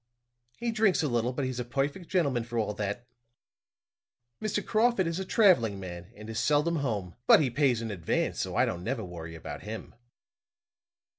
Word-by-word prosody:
He 235 -1 -1
drinks 215 -6 +3
a - - +2
little, 120 -1 +1
but 130 +1 -2
he's 130 -1 -3
a - - -1
perfect 140 +8 -2
gentleman 140 -10 +1
for 120 0 -5
all 105 -2 0
that. 105 +3 -3 1.4
Mr. 210 -1 -1
Crawford 220 -3 +3
is 165 +2 -2
a 190 - -3
traveling 170 - +4
man, 90 +1 -8
and 105 +1 -10
is 110 -1 -3
seldom 150 +3 +2
home; 105 - -2
but - - +9
he 135 -5 +1
pays 125 -3 +2
in 110 - -3
advance, 85 -5 -1
so - - -2
I - - +4
don't 90 0 -3
never 115 +2 -2
worry 85 -2 -8
about 80 -2 -7
him. 110 +2 -7
120 Hz, 180 wpm, -29 LUFS, 105-165 Hz, 1.4 s, but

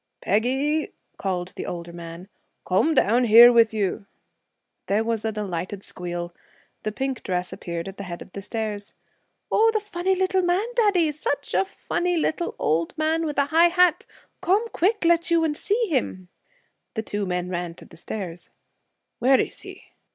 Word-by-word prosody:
'Peggy!' 265 +9 0 0.2
called 180 -2 -2
the - - -7
older 170 -1 -6
man. 170 +1 -9 0.4
'Come 250 - +2
down 240 +4 +4
here 235 +2 +9
with 230 -1 +5
you.' 205 -1 -2 0.8
There 205 +3 +2
was 225 -1 -2
a 220 - 0
delighted 195 -2 -4
squeal. 175 -1 -6 0.5
The 215 - -2
pink 265 +3 -3
dress 180 -1 -2
appeared 170 -2 -5
at 195 - -8
the 200 - -6
head 175 -1 -6
of - - -20
the 200 - -7
stairs. 210 -1 -5 0.6
'Oh, 450 +1 +5
the 440 - +1
funny 380 -2 -1
little 375 0 +1
man, 355 +4 +1
daddy! 395 -9 +3
Such 285 -1 -3
a 385 - +3
funny 355 -2 -2
little 325 +2 -1
old 160 - 0
man 320 +1 +1
with 295 - -4
a 280 - +4
high 335 +2 +7
hat! 360 -1 +3 0.3
Come 390 +5 +2
quick, 405 +1 +1
let 335 0 +3
you, 335 -1 +3
and 310 -2 0
see 420 +8 0
him.' 185 - -2 0.7
The 220 - -2
two 205 -2 -3
men 180 0 -2
ran 175 -2 -4
to - - -13
the - - -16
stairs. 175 0 -5 0.7
'Where 260 +2 +5
is - - -2
he?' - - -11
230 Hz, 175 wpm, -24 LUFS, -, 0.8 s, here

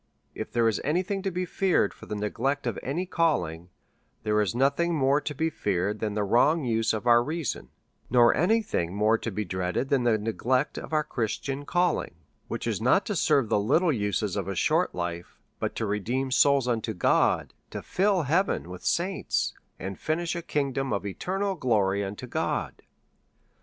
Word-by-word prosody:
101 - - -6
if - - -6
there 115 -1 +2
is 110 - 0
any 165 +6 +1
thing 195 +1 -3
to 195 - -1
be 180 0 -2
feared 180 - +1
for - - -14
the 105 - -4
neglect 115 +7 -1
of - - -2
any 165 +8 -2
calhng, 90 - 0 0.6
there 105 -1 +2
is 105 0 -1
nothing 140 +7 +2
more 140 0 +3
to 150 - -4
be 160 +4 0
feared 105 - -1
than 105 -1 -2
the 105 - 0
wrong 140 +10 +3
use 115 -2 +1
of 110 +1 -3
our 120 -1 +6
reason^ 150 - -3 0.4
nor 120 -1 +5
any 220 +7 +3
thing 90 - -2
more 105 +2 +3
to 115 - -3
be 105 0 -3
dreaded 95 +8 -2
than 140 -2 +3
the 120 -2 +3
neglect 125 +6 -1
of - - -9
our 155 -1 +2
Christian 135 +4 -3
calling, 175 - 0 0.3
which - - -4
is - - -1
not - - +3
to - - -2
serve 135 -6 +2
tlie 100 - +2
little 160 - +3
uses 105 -3 -1
of 100 -3 -2
a 100 - -2
sliort 90 - +2
life^ 85 -1 -5 0.2
but - - -2
to - - -2
redeem 120 +6 -1
souls 140 0 +4
unto 115 -2 -1
God^ - - +2 0.2
to - - -6
fill 190 -2 +1
heaven 160 - 0
with 90 - -8
saints^ 185 +3 0 0.2
and 95 +1 -6
finish 165 +2 -1
a 170 - -3
kingdom 135 -4 -1
of 100 -1 -1
eternal 195 - -2
glory 100 - +1
unto 100 +1 -6
God. - - -2
125 Hz, 190 wpm, -27 LUFS, 105-160 Hz, 0.6 s, our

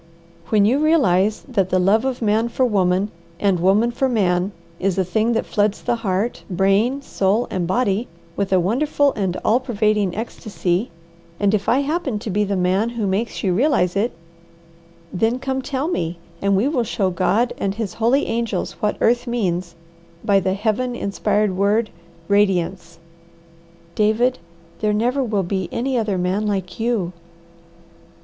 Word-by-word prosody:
When 210 -2 +4
you 250 +7 +3
realize 215 - +2
that 200 -8 0
the 185 - +2
love 200 +6 +3
of 255 -3 -2
man 220 +2 +2
for 255 +2 +1
woman, 195 -2 +1 0.3
and 195 -3 +2
woman 200 +7 +3
for 265 +2 0
man, 190 -4 +1 0.3
is 195 0 0
a 190 - +3
thing 220 +5 +1
that 230 - 0
floods 205 0 0
the 235 - 0
heart, 210 +1 -2
brain, 200 +9 +1
soul, 205 0 +1
and 180 -2 -1
body 215 +2 0 0.3
with 200 -1 -2
a 190 - +4
wonderful 280 - +1
and 190 -3 -2
all 230 +3 +4
pervading 215 -6 0
ecstasy, 210 -2 -2 0.5
and 205 0 +2
if 205 -1 0
I 260 +4 +3
happen 285 -5 -1
to 210 0 -5
be 210 +3 +1
the 200 -1 -1
man 185 +5 +1
who 235 -3 -3
makes 200 +4 -2
you 190 -3 +2
realize 205 - +2
it, 215 +5 +1 1.0
then 225 +6 +1
come 265 0 -2
tell 270 +2 -2
me, 170 - -2 0.2
and 200 0 +2
we 220 +7 +2
will 275 -5 +1
show 205 -4 -1
God 205 +6 +1
and 195 0 -1
His 220 -4 -4
holy 240 +5 +2
angels 230 -1 -2
what 210 - 0
earth 240 +2 +2
means 185 -8 -2 0.5
by 200 -1 +4
the 190 0 -1
Heaven 235 +4 -1
inspired 200 -1 0
word, 205 +4 +1 0.4
'radiance.'" 185 -4 +1 1.0
"David, 220 +4 +2 0.4
there 210 -1 +1
never 245 +6 +1
will 210 -5 0
be 185 -1 -2
any 260 +3 -1
other 215 -5 0
man 185 +4 0
like 190 -2 -3
you." 220 -6 0
210 Hz, 165 wpm, -21 LUFS, 190-235 Hz, 1.0 s, When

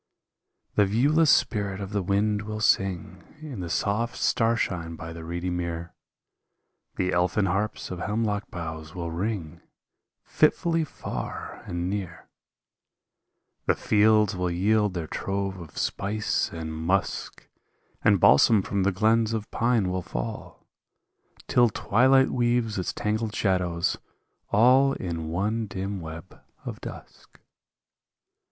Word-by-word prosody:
The 105 - +3
viewless 145 +10 +3
spirit 100 -3 +2
of 100 0 -6
the 100 -1 0
wind 105 +3 +1
will 105 +1 -5
sing 95 -4 +1 0.2
In 150 -8 -7
the 90 -2 -4
soft 105 +7 0
starshine 100 -9 0
by 80 0 -8
the 85 -1 -8
reedy 85 +2 -3
mere. 85 -1 -4 1.0
The 90 0 0
elfin 90 +3 +2
harps 100 +3 -2
of 90 - -5
hemlock 105 0 -1
boughs 80 -2 -7
will 85 -2 -4
ring 90 -2 -3 0.6
Fitfully 165 -1 +2
far 150 - -6
and 85 0 -2
near; 95 -3 -5 1.4
The - - +4
fields 105 0 +3
will 90 0 -1
yield 100 +3 +1
their 85 -2 -2
trove 95 +3 -3
of 80 -4 -11
spice 105 +2 -1
and 80 -1 -5
musk. 85 +5 -2 0.6
And 100 -3 +5
balsam 95 - +6
from 100 +1 -1
the 100 +1 +2
glens 110 +3 +2
of 110 -2 -4
pine 115 -6 +1
will 90 0 -1
fall. - - -6 0.8
Till 120 -1 +4
twilight 130 +6 +3
weaves 120 -4 +1
its 90 - -2
tangled 110 +1 -2
shadows 90 -3 0 0.5
all 130 +5 +5
In 85 -7 -4
one 105 +6 -1
dim 95 +1 -4
web 80 -1 -9 0.2
of - - -6
dusk. - - -11
100 Hz, 125 wpm, -26 LUFS, 85-110 Hz, 1.4 s, balsam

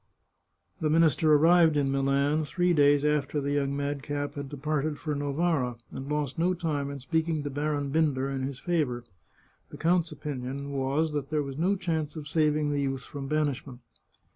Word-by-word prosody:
The 155 - 0
minister 160 -1 +4
arrived 160 +1 +5
in 140 -2 +1
Milan 140 +3 +1
three 175 +4 +1
days 145 -1 +4
after 150 -1 +1
the 140 0 -2
young 140 -1 0
madcap 145 0 -3
had 140 -1 -6
departed 150 +1 -2
for 150 0 -3
Novara, 145 -2 0 0.2
and 135 +1 -7
lost 150 -1 -2
no 180 +2 +2
time 150 -5 -2
in 140 0 -6
speaking 160 +3 -1
to 145 - -4
Baron 145 0 -1
Binder 145 -4 +1
in 135 -1 -3
his 135 0 -3
favour. 140 -7 -1 0.7
The - - -10
count's 170 0 +2
opinion 140 -1 -5
was, 140 +4 0
that 145 -2 -3
there 155 -1 0
was 140 +1 -6
no 190 +4 +2
chance 160 -5 -2
of 150 -2 -7
saving 150 -1 +1
the 145 -1 0
youth 135 -1 -2
from 140 -2 -7
banishment. 140 -4 -2
145 Hz, 175 wpm, -28 LUFS, 140-155 Hz, 0.7 s, arrived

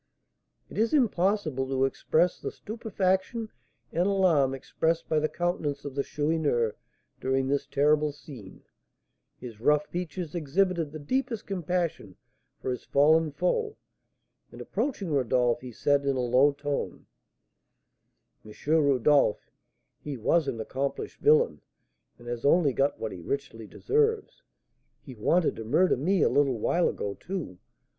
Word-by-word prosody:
It - - -7
is 230 +7 +2
impossible 190 - +1
to 135 0 +1
express 165 +5 +1
the - - -4
stupefaction 215 0 -2 0.4
and 175 +3 +1
alarm 170 -9 +3
expressed 160 +5 -1
by 155 - +2
the 155 0 0
countenance 170 -5 -2
of 140 - -5
the 140 - 0
Chourineur 145 -7 0 0.5
during 130 0 0
this 140 +1 -1
terrible 150 +1 +2
scene. 135 -9 -12 0.7
His 120 -4 -10
rough 150 +3 +3
features 175 -1 -5
exhibited 170 0 0
the 155 - -7
deepest 235 - -2
compassion 175 - -2 0.4
for - - -3
his 125 - -5
fallen 155 +2 +3
foe, 425 - -1 0.7
and - - -12
approaching 205 - -3
Rodolph, 125 -3 +1
he 125 -1 -8
said, 140 +4 +1
in 140 -1 0
a - - -1
low 125 +4 +4
tone: 145 0 -4 1.4
"M. 105 - -12 0.2
Rodolph, 145 -5 +3 0.5
he 145 -3 -6
was 145 +7 +2
an 115 - -3
accomplished 140 - -4
villain, 460 +2 +3 0.6
and 120 - -14
has 120 -1 -4
only 145 -1 +4
got 140 +2 0
what 110 - -3
he 90 - -8
richly 115 -1 -5
deserves; 445 - 0 0.6
he 130 - -11
wanted 160 +10 +1
to 110 - -5
murder 175 +12 +3
me 175 +6 +1
a - - +5
little 140 -4 +2
while 170 +10 +1
ago, 100 - -4
too. 170 - -6
150 Hz, 140 wpm, -27 LUFS, 135-180 Hz, 1.4 s, a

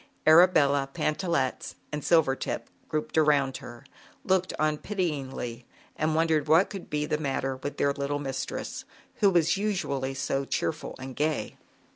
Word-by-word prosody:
Arabella, 150 -4 +5
Pantallettes 155 -3 -1 0.2
and 150 0 -3
Sil 165 -1 +4
vertip 135 0 -3 0.2
grouped 155 +1 0
around 140 -4 +3
her, 120 -1 -11 0.4
looked 185 -1 +2
on 155 -1 +1
pityingly 135 - -3 0.3
and 155 0 0
wondered 160 -2 +2
what 165 +5 +4
could 195 -3 -7
be 150 0 -1
the 150 0 -1
matter 135 -2 -2
with 145 +2 -6
their 140 - +2
little 140 0 -2
mistress, 135 -2 -4 0.3
who 200 - +5
was 170 -1 +3
usually 140 -10 -1
so 135 +1 -1
cheerful 155 +3 -3
and 130 -1 -8
gay. 155 +1 -1
150 Hz, 145 wpm, -27 LUFS, 135-160 Hz, 0.4 s, Arabella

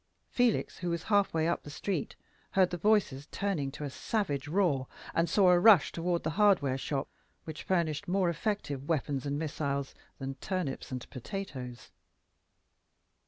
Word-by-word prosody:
Felix, 245 -3 +1
who 180 - -2
was 170 -1 -2
half 205 -2 +3
way 160 0 +1
up 170 - 0
the - - -10
street, 170 +2 -3 0.4
heard 185 -2 +4
the 175 - -2
voices 175 -8 +2
turning 185 -9 -1
to 150 - -7
a 145 - -2
savage 145 -7 -2
roar, 150 -7 +1 0.3
and 165 0 +2
saw 185 0 +5
a 175 - +5
rush 200 -5 +7
toward 170 0 -1
the 160 - -1
hardware 175 -11 +4
shop, 135 +1 -2 0.4
which 155 -1 -7
furnished 165 -5 0
more 185 0 +2
effective 165 -6 -2
weapons 145 -3 -1
and 140 0 -1
missiles 140 -3 -2 0.2
than 135 0 -4
turnips 180 -10 -3
and 125 -1 -5
potatoes. 130 - -6
165 Hz, 160 wpm, -31 LUFS, 140-190 Hz, 0.4 s, rush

